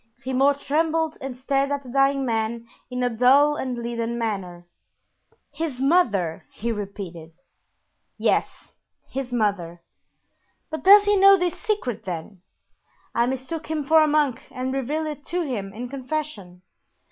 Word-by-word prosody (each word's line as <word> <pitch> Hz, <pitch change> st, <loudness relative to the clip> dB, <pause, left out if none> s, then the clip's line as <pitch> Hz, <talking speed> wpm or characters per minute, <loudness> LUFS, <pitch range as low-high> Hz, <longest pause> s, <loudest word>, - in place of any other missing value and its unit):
Grimaud 270 Hz, +2 st, +2 dB
trembled 320 Hz, +1 st, 0 dB
and 260 Hz, -2 st, -6 dB
stared 275 Hz, +2 st, 0 dB
at 285 Hz, 0 st, -2 dB
the 255 Hz, -, -11 dB
dying 275 Hz, +1 st, +2 dB
man 230 Hz, 0 st, -2 dB, 0.2 s
in 250 Hz, 0 st, -2 dB
a 245 Hz, -, +2 dB
dull 270 Hz, +6 st, +5 dB
and 255 Hz, -4 st, -3 dB
leaden 235 Hz, 0 st, -3 dB
manner. 190 Hz, -6 st, -4 dB, 0.9 s
"His 290 Hz, -3 st, -4 dB
mother!" 235 Hz, -, +1 dB
he 235 Hz, +2 st, -3 dB
repeated. 190 Hz, -6 st, -7 dB, 0.8 s
"Yes, -, -, -1 dB, 0.4 s
his 265 Hz, -2 st, -4 dB
mother." 190 Hz, -7 st, -1 dB, 0.9 s
"But 315 Hz, -, -5 dB
does 405 Hz, +2 st, +9 dB
he 410 Hz, 0 st, +3 dB
know 395 Hz, 0 st, +7 dB
this 355 Hz, -2 st, 0 dB
secret, 255 Hz, -, -3 dB
then?" 180 Hz, +1 st, -6 dB, 0.7 s
"I 235 Hz, +1 st, +2 dB
mistook 265 Hz, +5 st, -4 dB
him 310 Hz, -1 st, -2 dB
for 315 Hz, +3 st, +5 dB
a -, -, +2 dB
monk 295 Hz, -5 st, +1 dB
and 260 Hz, +1 st, -4 dB
revealed 285 Hz, +4 st, -2 dB
it 300 Hz, -1 st, -6 dB
to 355 Hz, 0 st, -1 dB
him 215 Hz, -10 st, -4 dB
in 235 Hz, +5 st, -6 dB
confession." 255 Hz, -9 st, -5 dB
260 Hz, 145 wpm, -24 LUFS, 220-300 Hz, 0.9 s, does